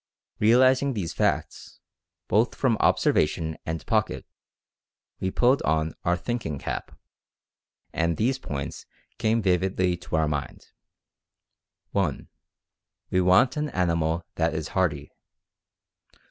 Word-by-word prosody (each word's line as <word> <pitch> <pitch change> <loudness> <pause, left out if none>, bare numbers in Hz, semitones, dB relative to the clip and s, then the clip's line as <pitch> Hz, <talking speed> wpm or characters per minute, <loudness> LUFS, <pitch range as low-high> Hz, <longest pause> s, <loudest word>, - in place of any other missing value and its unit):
Realizing 130 +5 +4
these 95 -8 -3
facts, - - -2 0.5
both 110 +3 +2
from 130 -4 +2
observation 80 +1 +2
and 80 -1 -4
pocket, - - 0 0.9
we 95 - -1
pulled 125 +7 +3
on 80 0 0
our 90 0 +1
'thinking 90 - -3
cap,' - - -5 1.0
and 85 -1 0
these 130 +4 +1
points 70 - -6 0.3
came 110 0 +1
vividly 95 -1 +1
to 85 -1 -5
our 80 -1 +2
mind: 75 -2 -5 1.2
"(1) 90 -9 -1 0.8
We 95 - +3
want 95 +9 +4
an 150 0 -1
animal 85 - 0
that 80 -1 +1
is 80 0 -3
hardy. 75 -6 -1
90 Hz, 110 wpm, -26 LUFS, 80-115 Hz, 1.2 s, Realizing